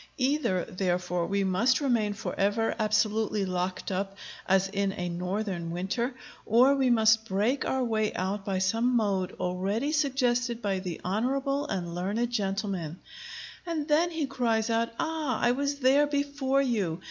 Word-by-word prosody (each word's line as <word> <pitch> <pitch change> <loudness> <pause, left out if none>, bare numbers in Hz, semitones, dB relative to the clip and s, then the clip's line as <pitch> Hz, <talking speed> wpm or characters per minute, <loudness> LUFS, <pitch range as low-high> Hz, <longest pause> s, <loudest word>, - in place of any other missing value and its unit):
Either, 260 - +1
therefore, 180 -2 -1
we 200 0 0
must 195 +7 +2
remain 235 -7 +1
forever 205 +2 0
absolutely 215 -1 +1
locked 185 +1 -3
up 195 +1 -3 0.3
as 190 0 +3
in 200 0 -1
a 180 -2 -3
northern 180 0 -3
winter, 195 +9 -2 0.3
or 250 +5 +5
we 265 -2 +2
must 220 -1 +4
break 215 +8 0
our 265 -1 0
way 220 -3 0
out 195 +2 -2
by 195 -1 -1
some 225 +7 +1
mode 195 -5 +1
already 195 +10 -1
suggested 250 -5 +1
by 200 -4 -1
the 180 -3 -5
honorable 275 +8 0
and 175 -3 -3
learned 205 +7 -1
gentleman; 195 -6 -2 0.6
and 325 -4 -3
then 320 +3 +3
he 320 -3 -2
cries 235 -4 0
out, 230 +1 +1
"Ah, 315 -7 -1
I 240 - +3
was 280 +3 -1
there 280 +2 +4
before 280 -1 0
you! 200 -10 -1
220 Hz, 150 wpm, -28 LUFS, 190-260 Hz, 0.6 s, or